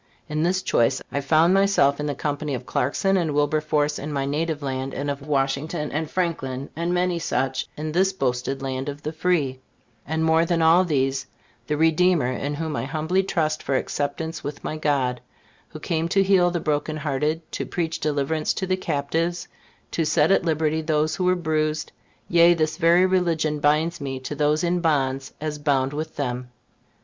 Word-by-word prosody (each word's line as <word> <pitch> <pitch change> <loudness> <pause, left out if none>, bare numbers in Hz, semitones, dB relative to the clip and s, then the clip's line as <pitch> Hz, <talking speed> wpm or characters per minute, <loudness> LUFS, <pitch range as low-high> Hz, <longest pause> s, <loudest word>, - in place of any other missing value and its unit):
In 155 0 -2
this 185 +3 +1
choice, 115 - +2
I 140 - -1
found 160 +5 +4
myself 195 -8 +3
in 150 - -2
the 145 - -2
company 145 0 -2
of 125 0 -7
Clarkson 195 +9 +1
and 160 -5 0
Wilberforce 150 0 +1
in 150 +2 -5
my 140 -2 -1
native 155 +1 -2
land, 135 0 -3
and 145 +1 -2
of 140 0 -7
Washington 145 +2 -1
and 155 +1 -2
Franklin, 140 -7 -2
and 170 +2 -1
many 180 -1 +1
such, 135 -5 -1
in 155 +1 -3
this 190 +4 +2
boasted 135 -4 -2
land 130 +1 -3
of 145 0 -8
the 155 - -3
free; 155 -6 0 0.5
and 160 +1 -1
more 160 +1 +4
than 170 0 0
all 165 +3 +5
these, 135 -5 0 0.4
the 150 - 0
Redeemer 160 -3 +3
in 140 +3 -3
whom 160 0 -3
I - - -2
humbly 160 +6 0
trust 155 -5 -1
for 135 - -1
acceptance 160 +4 -3
with 145 0 -6
my - - -3
God, 135 -5 0 0.5
who - - -9
came 165 0 -1
to 195 +2 +3
heal 190 -2 +4
the 175 -1 -2
broken 155 0 -1
hearted, 150 +2 -1
to - - -4
preach 165 -2 -2
deliverance 150 +1 0
to 190 - -2
the 185 0 0
captives, 165 +2 -2 0.4
to 165 - 0
set 155 +1 +3
at 195 - +4
liberty 160 -1 0
those 155 0 0
who 185 - 0
were 180 0 +4
bruised; 155 -2 -1 0.4
yea, 170 0 +6
this 155 -1 0
very 175 +1 +5
religion 165 -5 +1
binds 155 +3 +1
me 135 -2 -4
to 130 - -5
those 150 +2 +1
in 175 +1 +1
bonds 135 -5 0
as 150 -1 -4
bound 140 -2 +1
with 155 +2 -5
them. 125 -3 -3
155 Hz, 185 wpm, -24 LUFS, 140-170 Hz, 0.5 s, yea